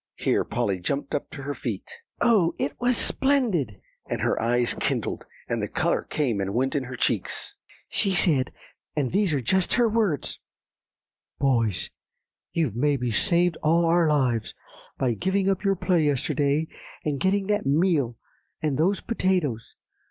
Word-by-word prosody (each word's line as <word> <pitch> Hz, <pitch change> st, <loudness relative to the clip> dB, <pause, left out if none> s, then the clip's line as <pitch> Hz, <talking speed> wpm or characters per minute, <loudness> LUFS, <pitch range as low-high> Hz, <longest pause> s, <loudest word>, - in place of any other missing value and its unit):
Here -, -, +1 dB
Polly 95 Hz, -2 st, -1 dB
jumped 140 Hz, +10 st, -3 dB
up 145 Hz, -, -2 dB
to 140 Hz, -, -8 dB
her 145 Hz, +1 st, -3 dB
feet. -, -, -5 dB, 0.3 s
"Oh, 210 Hz, -8 st, +4 dB
it 145 Hz, -, -1 dB
was 245 Hz, 0 st, +2 dB
so -, -, +2 dB
splendid!" 215 Hz, -, +1 dB, 0.3 s
and -, -, -2 dB
her -, -, +1 dB
eyes 120 Hz, +1 st, +1 dB
kindled, -, -, -2 dB, 0.2 s
and -, -, -1 dB
the -, -, -1 dB
color -, -, 0 dB
came 120 Hz, -9 st, 0 dB
and 100 Hz, +2 st, -3 dB
went 130 Hz, +2 st, +1 dB
in 140 Hz, -3 st, -1 dB
her 125 Hz, +1 st, -6 dB
cheeks; -, -, -1 dB, 0.3 s
"she 195 Hz, -2 st, +1 dB
said, 145 Hz, -7 st, +3 dB, 0.4 s
and 140 Hz, -4 st, 0 dB
these 200 Hz, -1 st, +2 dB
are 140 Hz, -3 st, 0 dB
just 185 Hz, +9 st, +1 dB
her 240 Hz, -1 st, +4 dB
words, 210 Hz, -, 0 dB, 1.0 s
'Boys, 115 Hz, -9 st, +1 dB, 0.6 s
you've 155 Hz, -10 st, 0 dB
maybe 130 Hz, -2 st, +1 dB
saved 170 Hz, -, +2 dB
all 165 Hz, +2 st, +3 dB
our 170 Hz, 0 st, +4 dB
lives, 125 Hz, -7 st, +1 dB, 0.4 s
by 125 Hz, -3 st, +1 dB
giving 190 Hz, -, 0 dB
up 195 Hz, 0 st, +1 dB
your 195 Hz, -1 st, +2 dB
play 180 Hz, -2 st, +2 dB
yesterday, 145 Hz, +2 st, +1 dB, 0.4 s
and 145 Hz, -3 st, -1 dB
getting 195 Hz, +1 st, +1 dB
that 205 Hz, -2 st, 0 dB
meal 145 Hz, -6 st, +2 dB, 0.4 s
and 150 Hz, -3 st, -1 dB
those 190 Hz, +5 st, +2 dB
potatoes. 180 Hz, -, -1 dB
150 Hz, 160 wpm, -25 LUFS, 130-190 Hz, 1.0 s, Oh